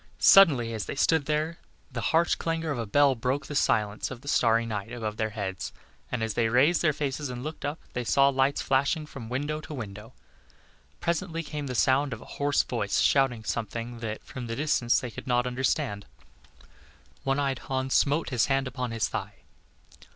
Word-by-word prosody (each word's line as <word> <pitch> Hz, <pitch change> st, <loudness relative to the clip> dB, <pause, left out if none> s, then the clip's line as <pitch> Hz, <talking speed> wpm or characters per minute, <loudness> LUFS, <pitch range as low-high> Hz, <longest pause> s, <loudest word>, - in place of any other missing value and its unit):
Suddenly, 135 Hz, -12 st, +6 dB
as 110 Hz, -3 st, -3 dB
they -, -, -4 dB
stood 145 Hz, +1 st, +2 dB
there, 155 Hz, +2 st, -1 dB, 0.3 s
the 120 Hz, -2 st, -4 dB
harsh 165 Hz, +1 st, +3 dB
clangor 165 Hz, -1 st, -2 dB
of 135 Hz, -, -2 dB
a 115 Hz, -, -3 dB
bell 145 Hz, +5 st, +4 dB
broke 130 Hz, +4 st, -2 dB
the -, -, -7 dB
silence 105 Hz, -7 st, +1 dB
of 130 Hz, -2 st, -8 dB
the 145 Hz, -, -14 dB
starry 115 Hz, -4 st, +3 dB
night 110 Hz, 0 st, -4 dB
above 110 Hz, -3 st, -4 dB
their 110 Hz, 0 st, 0 dB
heads, 95 Hz, -5 st, -4 dB, 0.4 s
and 125 Hz, -3 st, -1 dB
as 110 Hz, -1 st, -1 dB
they 115 Hz, +1 st, +1 dB
raised 140 Hz, +9 st, +4 dB
their 155 Hz, -, +4 dB
faces 145 Hz, -1 st, -3 dB
and 125 Hz, 0 st, -6 dB
looked 155 Hz, +2 st, -6 dB
up, 145 Hz, +3 st, -3 dB
they 125 Hz, -, -2 dB
saw 140 Hz, +3 st, +4 dB
lights 135 Hz, +1 st, +1 dB
flashing 140 Hz, +3 st, +1 dB
from 125 Hz, -7 st, -9 dB
window 145 Hz, +5 st, -2 dB
to 155 Hz, -, -8 dB
window. 105 Hz, 0 st, -8 dB, 0.9 s
Presently 170 Hz, 0 st, -1 dB
came 150 Hz, -2 st, -5 dB
the 125 Hz, -, -4 dB
sound 130 Hz, +3 st, +3 dB
of 115 Hz, -, -8 dB
a -, -, -12 dB, 0.2 s
hoarse 145 Hz, 0 st, +3 dB
voice -, -, -1 dB
shouting 135 Hz, -5 st, +3 dB
something 115 Hz, +1 st, -4 dB
that, 110 Hz, -2 st, -5 dB
from 125 Hz, -4 st, -7 dB
the 115 Hz, -, -3 dB
distance, 130 Hz, -4 st, +2 dB
they 125 Hz, -, -6 dB
could 130 Hz, -, -9 dB
not 125 Hz, 0 st, +2 dB
understand. 125 Hz, -5 st, -1 dB, 1.2 s
One 135 Hz, 0 st, +1 dB
eyed 135 Hz, -3 st, 0 dB
Hans 130 Hz, 0 st, -2 dB
smote 145 Hz, +3 st, +2 dB
his 120 Hz, -3 st, +2 dB
hand 135 Hz, 0 st, +1 dB
upon 125 Hz, -1 st, -3 dB
his 115 Hz, -1 st, 0 dB
thigh. -, -, -6 dB
130 Hz, 195 wpm, -27 LUFS, 115-145 Hz, 1.2 s, Suddenly